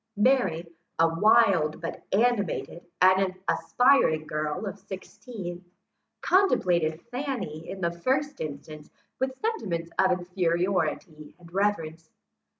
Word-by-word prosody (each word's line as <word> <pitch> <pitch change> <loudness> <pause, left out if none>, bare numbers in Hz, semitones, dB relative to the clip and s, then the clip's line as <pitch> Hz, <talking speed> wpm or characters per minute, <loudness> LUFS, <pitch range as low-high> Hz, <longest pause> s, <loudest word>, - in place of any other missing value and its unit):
Mary, 205 -8 +2 0.3
a 165 - +5
wild, 170 -3 +3
but 165 -1 -6
animated 200 -5 0 0.2
and 185 0 +4
aspiring 245 - +3
girl 150 +6 -3
of 200 0 -6
sixteen, 190 -1 -8 0.6
contemplated 175 - +2
Fanny, 245 - -4
in 190 0 -7
the 170 -1 +1
first 270 +11 -1
instance, 150 0 -7 0.3
with 265 0 -2
sentiments 180 - -2
of 190 - +5
inferiority 180 -3 -1
and 170 -1 -17
reverence. 165 -5 -1
185 Hz, 105 wpm, -27 LUFS, 165-220 Hz, 0.6 s, a